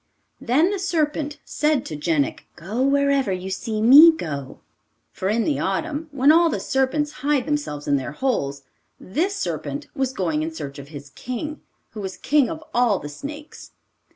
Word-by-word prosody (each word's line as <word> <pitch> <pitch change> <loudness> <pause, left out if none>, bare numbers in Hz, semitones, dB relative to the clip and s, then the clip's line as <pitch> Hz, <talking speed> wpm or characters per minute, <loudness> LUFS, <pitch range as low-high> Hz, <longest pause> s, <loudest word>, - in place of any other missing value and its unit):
Then 305 +10 +2
the 405 - -2
serpent 305 -5 -1
said 300 -3 0
to 155 - -5
Jenik, 150 -2 -1
'Go 205 +9 -4
wherever 280 -3 +2
you 185 +1 -4
see 215 +2 -2
me 290 +8 +10
go,' 140 - -6 0.5
for 190 - -3
in 225 +2 +1
the 295 - 0
autumn, 305 - -2
when 280 +1 +4
all 335 +1 +5
the - - -2
serpents 270 +3 0
hide 285 -2 +1
themselves 290 - -3
in 145 - +3
their 135 +2 -5
holes, 140 - -1 0.4
this 350 - -1
serpent 395 - -4
was 265 -1 -1
going 165 -10 -1
in 160 - -2
search 145 -3 -7
of 140 - -10
his 145 -2 -10
king, 255 - -5 0.3
who 215 - -7
was 190 -1 -5
king 290 -3 +2
of 320 -1 -6
all 240 -5 +3
the 145 - -7
snakes. 295 - -9
255 Hz, 175 wpm, -23 LUFS, -, 0.5 s, me